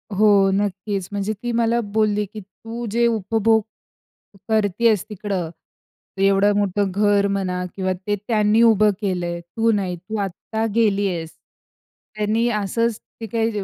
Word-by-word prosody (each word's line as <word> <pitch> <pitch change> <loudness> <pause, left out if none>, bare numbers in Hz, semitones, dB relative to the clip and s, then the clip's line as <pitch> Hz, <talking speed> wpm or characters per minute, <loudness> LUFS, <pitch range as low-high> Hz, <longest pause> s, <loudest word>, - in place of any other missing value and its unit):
हो, 200 -1 +5
नक्कीच, 195 -1 -2
म्हणजे 205 +1 -2
ती 240 - -1
मला 235 0 +1
बोलली 210 -1 +2
की 210 +2 -10
"तू 225 +5 -8
जे 235 +2 +2
उपभोग 225 0 +2 0.9
करत 215 -1 0
आहेस, 220 -5 +4
तिकडं 195 -4 -3 0.7
एवढं 195 +1 +4
मोठं 200 -1 0
घर 205 +1 +2
म्हणा 185 -2 -2
किंवा 185 -1 -1
ते 205 - +2
त्यांनी 215 -1 +3
उभं 215 -2 +5
केले 185 -4 -1
आहे, 170 0 -4
तू 225 +7 0
नाही, 195 -4 -1
तू 190 +6 -6
आत्ता 205 +3 -3
गेली 205 -3 +2
आहेस. 165 -3 -4 0.9
त्यांनी 215 +2 +1
असंच, 225 +1 -1 0.2
ती 225 - -4
काही 225 +1 0
205 Hz, 145 wpm, -21 LUFS, 195-220 Hz, 0.9 s, हो